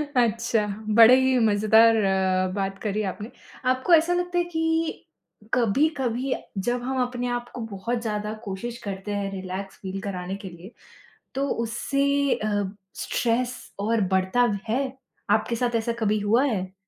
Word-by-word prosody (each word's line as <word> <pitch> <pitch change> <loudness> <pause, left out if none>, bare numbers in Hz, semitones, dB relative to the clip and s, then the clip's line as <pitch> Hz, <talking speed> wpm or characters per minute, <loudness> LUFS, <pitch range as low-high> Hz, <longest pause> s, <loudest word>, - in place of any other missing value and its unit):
अच्छा, 230 -2 +2 0.3
बड़े 230 +2 +9
ही 260 -1 +3
मज़ेदार 220 +1 +5
अ, 190 -1 +2
बात 195 -1 -2
करी 215 0 -1
आपने। 210 +5 -9 0.4
आपको 260 +7 +2
ऐसा 335 +2 +5
लगता 355 0 -1
है 350 - +3
कि 325 0 -1 0.4
कभी-कभी 255 +1 +1 0.3
जब 245 0 0
हम 260 +1 -1
अपने 245 0 -2
आप 240 0 -9
को 245 - -5
बहुत 230 +5 -2
ज़्यादा 210 -1 -3
कोशिश 230 +4 -5
करते 195 0 -5
हैं 200 -1 -2
रिलैक्स 190 0 -6
फ़ील 195 0 -5
कराने 190 -2 -4
के - - -5
लिए 175 +4 -12 0.6
तो 275 +1 0 0.2
उससे 240 +4 -1 0.3
अ, 205 -1 -1 0.3
स्ट्रेस 245 +1 0 0.2
और 220 +2 +1
बढ़ता 190 +6 +3 0.2
है? 250 +5 +1 0.5
आपके 220 +2 +2
साथ 240 0 -1
ऐसा 230 +1 0
कभी 215 -1 +1
हुआ 215 +5 +3
है? 190 -7 -2
225 Hz, 150 wpm, -25 LUFS, 200-250 Hz, 0.6 s, बड़े